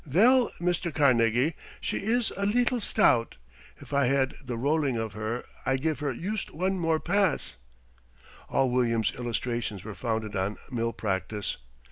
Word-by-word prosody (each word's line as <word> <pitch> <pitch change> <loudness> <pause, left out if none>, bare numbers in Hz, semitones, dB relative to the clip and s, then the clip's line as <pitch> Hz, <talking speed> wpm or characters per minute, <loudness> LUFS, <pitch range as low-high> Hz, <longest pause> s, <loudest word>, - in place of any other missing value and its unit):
"Vell, 230 - +4
Mr. 175 0 0
Carnegie, 130 -1 +3 0.3
she - - -2
is 230 +3 +1
a 200 - -3
leetle 245 +2 +2
stout. 115 - +3 0.4
If - - -11
I 140 -1 +3
had 135 0 +2
the 125 -3 -4
rolling 140 0 +1
of 110 -2 -3
her 110 +3 -3 0.2
I 135 +1 +1
give 155 +3 -1
her 145 -2 -1
yust 190 - -3
one 185 +4 -1
more 165 -2 +2
pass." 200 +4 0 0.9
All 135 -2 +2
William's 115 -3 +1
illustrations 120 -4 -3
were 110 0 -6
founded 110 -2 -3
on 95 +2 -1
mill 115 -2 0
practice. 100 -2 -3
130 Hz, 150 wpm, -28 LUFS, 115-170 Hz, 0.9 s, Vell